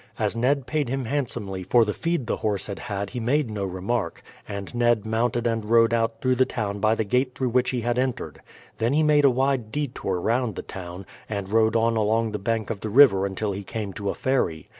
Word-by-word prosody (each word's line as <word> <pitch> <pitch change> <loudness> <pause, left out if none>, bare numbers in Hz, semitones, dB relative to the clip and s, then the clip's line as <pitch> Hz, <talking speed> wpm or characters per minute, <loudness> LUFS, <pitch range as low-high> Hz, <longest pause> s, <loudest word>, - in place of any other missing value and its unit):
As - - -1
Ned 130 +3 +1
paid 150 -4 -1
him 135 0 -2
handsomely 115 -8 -3
for 115 +5 +4
the 105 - -1
feed 165 -6 -1
the - - -1
horse 105 -3 -1
had 100 - -5
had 100 -4 -4
he 125 - -4
made 125 +2 +1
no 105 -2 -3
remark, 95 +1 -3 0.2
and 100 +1 -6
Ned 120 -3 +2
mounted 120 +2 0
and 115 -2 0
rode 115 0 +5
out 115 -1 0
through 130 0 +2
the 130 - +5
town 105 -3 -3
by 110 +2 +3
the 110 - 0
gate 125 +4 0
through 130 -2 -1
which 125 +1 +2
he 125 -2 -1
had 120 +2 0
entered. 130 -1 -3 0.4
Then 115 +4 +1
he 155 +2 +3
made 150 -1 +4
a - - +8
wide 130 -3 0
detour 125 -10 -2
round 115 +1 0
the - - -5
town, 90 0 -8 0.2
and 100 -1 -4
rode 110 0 +3
on 115 0 +2
along 110 +1 +1
the 105 - -3
bank 110 +2 -1
of 105 - -4
the 110 - -3
river 105 -5 +6
until 100 +2 -2
he 100 +1 -5
came 105 -1 -5
to 100 +2 -3
a - - -2
ferry. 90 - -1
115 Hz, 230 wpm, -25 LUFS, 100-125 Hz, 0.4 s, a